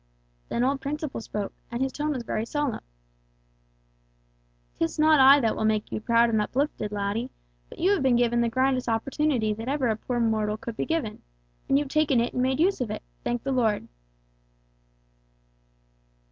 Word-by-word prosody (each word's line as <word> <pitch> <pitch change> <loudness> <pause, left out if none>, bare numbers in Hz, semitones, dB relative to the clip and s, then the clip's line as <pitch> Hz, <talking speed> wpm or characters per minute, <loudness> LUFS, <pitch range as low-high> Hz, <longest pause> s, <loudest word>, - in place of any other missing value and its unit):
Then 235 - 0
old 270 +1 0
Principle 295 -2 -4
spoke, 210 -2 -5 0.2
and 235 - -4
his 265 0 0
tone 300 +2 -2
was 260 -5 -2
very 220 -1 -2
solemn: 290 +1 -2 2.0
"'Tis 165 - -1
not 310 -1 +5
I 270 +2 +8
that 225 -4 +1
will - - -2
make 215 -1 0
you - - -3
proud 235 0 +3
and 220 -1 +2
uplifted, 245 -2 -2
laddie, 205 +4 -2 0.4
but - - -12
you 370 +4 +2
have 400 -6 +2
been 260 -2 +3
given 240 0 +2
the 235 - +1
grandest 260 +1 +1
opportunity 235 -1 0
that 225 +4 -6
ever 275 -3 0
a 220 - +1
poor 240 +3 -3
mortal 215 -2 0
could 230 +1 -7
be - - -3
given, 320 -10 -2 0.5
and 275 - +4
you've 290 -1 -1
taken 285 -4 +2
it 235 - -1
and 250 - -1
made 260 +2 +1
use 370 -1 +2
of 245 - -2
it, - - -5 0.2
thank 240 0 -2
the 275 - -2
Lord!" 225 -5 +1
245 Hz, 180 wpm, -26 LUFS, 225-275 Hz, 2.0 s, I